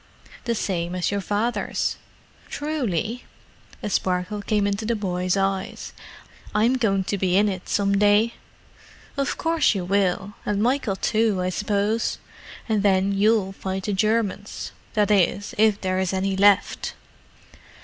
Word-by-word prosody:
"The 235 -1 0
same 175 -4 -2
as 180 +1 0
your 200 0 -1
father's." 210 +5 -1 0.5
"Truly?" 250 - -2 0.6
A - - -2
sparkle 185 +3 -1
came 205 0 +1
into 200 +2 -1
the 230 +2 0
boy's 185 -2 -1
eyes. 195 -1 -2 0.6
"I'm 225 +4 +4
going 195 -5 +2
to 200 +1 -2
be 185 0 +2
in 210 +1 +4
it 190 -2 -4
some 200 -1 +2
day." 210 +3 +4 0.8
"Of 275 -1 -1
course 330 -7 +2
you 185 -2 -2
will—and 200 +1 -1
Michael 245 -5 +1
too, 215 0 +1
I 180 - 0
suppose. 210 +3 0 0.5
And 215 -3 +1
then 195 -1 +3
you'll 200 0 +2
fight 190 0 -4
the 205 - -1
Germans—that 210 0 -1
is, 195 0 +2
if 215 -2 +4
there 185 -1 -1
are 190 - +1
any 190 0 0
left." 200 +1 +3
200 Hz, 140 wpm, -24 LUFS, 190-215 Hz, 0.8 s, I'm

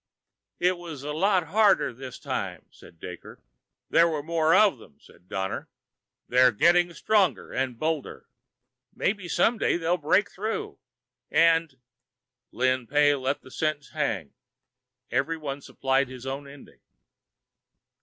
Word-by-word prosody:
"It 180 0 +1
was 160 -6 -8
a 150 +1 -4
lot 180 0 +1
harder 205 - +3
this 130 +1 -9
time," 95 - -4
said 85 - -17
Daker. 90 +1 -10 0.5
"There 170 +1 +5
were 155 -3 -3
more 165 +1 +2
of 200 - +4
them," 75 - -17
said 90 - -21
Donner. 95 0 -3 0.6
"They're 125 0 +5
getting 175 +9 +3
stronger 210 -4 +1
and 130 -2 -2
bolder." 155 0 -3 0.7
"Maybe 200 -3 -1
some 230 +6 +2
day - - +2
they'll 170 +1 0
break 165 +6 +2
through, 225 - -4 0.5
and...." 165 -4 +3 0.7
Lin 130 -1 0
Pey 145 +1 +4
let 135 0 -2
the 130 - -14
sentence 155 -1 -2
hang. 105 - -2 0.8
Everyone 140 +2 -2
supplied 135 0 0
his 130 0 -10
own 135 +1 -5
ending. 140 0 -15
150 Hz, 130 wpm, -26 LUFS, 130-175 Hz, 0.8 s, There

